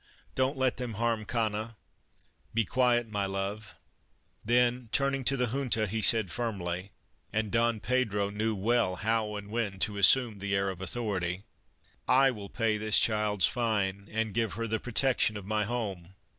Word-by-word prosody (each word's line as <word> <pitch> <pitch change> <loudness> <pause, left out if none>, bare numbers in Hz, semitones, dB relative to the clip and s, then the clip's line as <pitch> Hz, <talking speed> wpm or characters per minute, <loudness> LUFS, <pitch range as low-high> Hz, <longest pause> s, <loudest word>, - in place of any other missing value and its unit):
Don't 130 +2 0
let 130 -1 +1
them 120 -3 -5
harm 115 0 -1
Cana." 110 0 -2 0.4
" - - -38
Be 115 -1 +2
quiet, 120 0 +2
my 100 -2 -2
love 100 +2 -4 0.3
"; - - -43 0.3
then 120 +1 +1
turn 140 0 +1
ing 135 -1 -2
to 135 - +3
the 125 - +1
Junta 120 -4 0
he 110 +2 -3
said 110 -3 +3
firmly 95 -5 -3 0.4
(and 110 -2 -1
Don 115 +1 +2
Pedro 105 -5 0
knew 110 +1 -1
well 110 -1 +1
how 110 0 0
and 105 0 -7
when 110 -4 -2
to 105 -1 0
assume 115 0 +5
the 100 0 -1
air 100 0 0
of 90 -1 -10
authority): 95 -3 -1 0.3
" - - -35
1 135 +1 +4
will 100 -2 -8
pay 110 -2 0
this 110 -1 +2
child's 105 -3 +3
fine 100 -5 -1
and 110 -1 -2
give 115 -1 0
her 115 +1 -3
the 110 0 -1
protec 125 +3 +1
tion 110 - +2
of 100 - -9
my 105 +1 0
home. 100 -6 -5
110 Hz, 185 wpm, -29 LUFS, 100-120 Hz, 0.4 s, assume